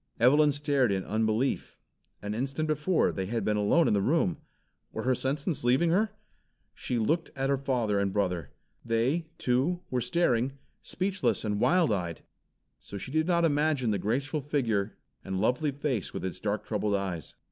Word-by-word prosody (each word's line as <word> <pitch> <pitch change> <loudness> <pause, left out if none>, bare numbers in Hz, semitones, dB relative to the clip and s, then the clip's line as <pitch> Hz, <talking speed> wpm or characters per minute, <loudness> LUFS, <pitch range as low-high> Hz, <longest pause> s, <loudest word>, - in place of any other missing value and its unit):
Evelyn 145 +5 +5
stared 140 -4 +1
in 95 -1 0
unbelief. 110 +4 0 0.5
An 105 0 -3
instant 135 +7 -2
before 155 +4 +2
they 95 -1 -3
had 115 +3 -2
been 105 - +1
alone 105 +11 +3
in - - +3
the 100 - +2
room! 130 - +1 0.5
Were - - -4
her 130 - +2
senses 140 +4 -1
leaving 130 +8 +3
her? 210 +5 +2 0.6
She 125 - -3
looked 160 +9 0
at 135 0 0
her 140 - +2
father 120 -7 0
and 100 -1 0
brother. 90 -6 -1 0.3
They, 125 +9 0
too, 135 +9 +1
were 125 -1 0
staring, 125 -2 +1 0.3
speechless 190 - -1
and 105 -1 -1
wild 170 -8 +3
eyed. 85 -4 -3 0.6
So 100 - -9
she 115 - -7
did 155 +2 +1
not 170 -2 +3
imagine 145 -5 +1
the 100 - 0
graceful 135 - -1
figure 115 -8 -1 0.3
and 95 -1 -3
lovely 125 +8 +1
face 135 -5 -3
with - - -3
its 90 0 -5
dark 105 +1 -2
troubled 105 -1 0
eyes. 95 -5 -4
125 Hz, 170 wpm, -29 LUFS, 105-150 Hz, 0.6 s, Evelyn